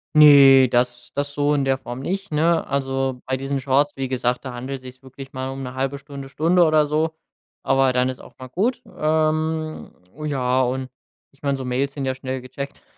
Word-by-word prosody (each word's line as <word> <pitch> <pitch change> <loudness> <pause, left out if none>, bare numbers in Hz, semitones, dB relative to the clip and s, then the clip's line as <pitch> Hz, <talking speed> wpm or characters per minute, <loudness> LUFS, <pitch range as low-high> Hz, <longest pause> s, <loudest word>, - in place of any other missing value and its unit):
Ne, 140 -3 +8
das 120 0 0
das 145 0 -2
so 145 +1 +1
in 140 - 0
der 135 0 +1
Form 120 -1 -7
nicht, 195 +6 -4
ne? 165 +2 +2
Also, 135 -2 -1
bei 130 - -1
diesen 135 +1 -3
Shorts, 140 +2 +1
wie 135 -1 -3
gesagt, 125 0 -1
da 130 - -5
handelt 130 +3 -5
es - - -18
sich 130 +1 -12
wirklich 135 +1 -12
mal 130 0 -4
um 135 0 -6
'ne 125 0 -6
1/2 135 +2 -2
Stunde, 140 -1 -10
Stunde 170 +5 +3
oder 155 -1 +4
so, 155 +2 -1 0.5
aber 135 -1 +3
dann 125 +1 +2
ist 130 - -6
auch - - -16
mal 130 - -9
gut. 225 - -1
Ähm, 155 0 -1 0.3
ja, 130 -3 +1
und 130 +1 -2 0.4
ich 140 - -30
meine, 140 -1 0
so 130 - -6
Mails 135 +2 -1
sind 140 -2 -4
ja 130 - 0
schnell 130 0 -5
gecheckt. 140 +2 -8
135 Hz, 210 wpm, -22 LUFS, 130-150 Hz, 0.5 s, Ne